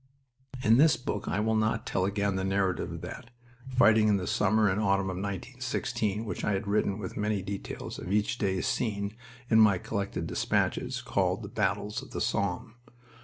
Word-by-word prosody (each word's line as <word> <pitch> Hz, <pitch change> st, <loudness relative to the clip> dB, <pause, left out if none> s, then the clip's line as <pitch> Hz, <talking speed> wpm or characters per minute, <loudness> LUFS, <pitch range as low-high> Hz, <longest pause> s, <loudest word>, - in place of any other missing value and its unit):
In 115 Hz, 0 st, +5 dB
this 150 Hz, 0 st, +5 dB
book 120 Hz, -, -4 dB
I -, -, 0 dB
will 110 Hz, +1 st, +1 dB
not 110 Hz, 0 st, +1 dB
tell 95 Hz, -, 0 dB
again 100 Hz, 0 st, 0 dB
the 95 Hz, -, -1 dB
narrative 95 Hz, -1 st, 0 dB
of -, -, -6 dB
that, 115 Hz, -, -8 dB, 0.4 s
fighting 110 Hz, -4 st, +5 dB
in 105 Hz, -1 st, +4 dB
the 90 Hz, -, -3 dB
summer 105 Hz, +3 st, +2 dB
and 100 Hz, +2 st, +1 dB
autumn 95 Hz, -2 st, +1 dB
of 90 Hz, -, -5 dB
1916, 110 Hz, +1 st, -3 dB
which 105 Hz, -, -4 dB
I 105 Hz, -, +1 dB
have 95 Hz, +2 st, -2 dB
written 100 Hz, -1 st, +1 dB
with 95 Hz, -4 st, -6 dB
many 105 Hz, -2 st, 0 dB
details 100 Hz, 0 st, -6 dB
of 90 Hz, -, -6 dB
each 105 Hz, +3 st, +1 dB
day's 95 Hz, -2 st, 0 dB
scene 100 Hz, -3 st, -1 dB, 0.3 s
in 110 Hz, -1 st, +5 dB
my 105 Hz, -4 st, +6 dB
collected 100 Hz, +2 st, -3 dB
despatches -, -, -1 dB
called -, -, 0 dB
The -, -, -6 dB
Battles 105 Hz, +1 st, -1 dB
of -, -, -12 dB
the -, -, -3 dB
Somme. 100 Hz, +4 st, -1 dB
105 Hz, 185 wpm, -29 LUFS, 95-110 Hz, 0.4 s, my